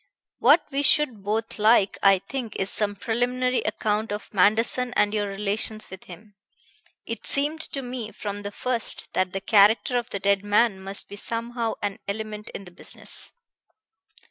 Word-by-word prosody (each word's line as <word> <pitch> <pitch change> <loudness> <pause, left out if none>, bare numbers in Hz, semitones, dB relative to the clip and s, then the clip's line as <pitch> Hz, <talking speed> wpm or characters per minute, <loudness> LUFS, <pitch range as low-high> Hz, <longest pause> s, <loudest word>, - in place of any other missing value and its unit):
What - - +5
we 275 +1 0
should 285 -6 +3
both 220 +2 -2
like, 210 -2 +4
I 195 -1 +6
think, 235 +2 -6
is 195 +1 +1
some 205 -1 +1
preliminary 250 +4 0
account 215 0 -1
of 210 +1 -6
Manderson 225 +5 +3
and 205 0 +2
your 205 -1 0
relations 210 +2 -1
with 190 - -10
him. 205 +4 -13 0.7
It - - -5
seemed 295 +3 +1
to 275 - -4
me 245 -3 -4
from 205 -1 -6
the 205 - -5
first 235 +2 -1
that 185 -1 0
the 195 - -4
character 220 +5 +4
of 240 - -8
the 200 - -4
dead 200 0 +2
man 205 -1 +2
must 195 +1 -7
be 200 - -10
somehow 230 +1 -3
an 200 -1 -2
element 210 +1 -5
in 200 - -7
the 180 - -12
business." - - -6
215 Hz, 170 wpm, -25 LUFS, 200-240 Hz, 0.7 s, I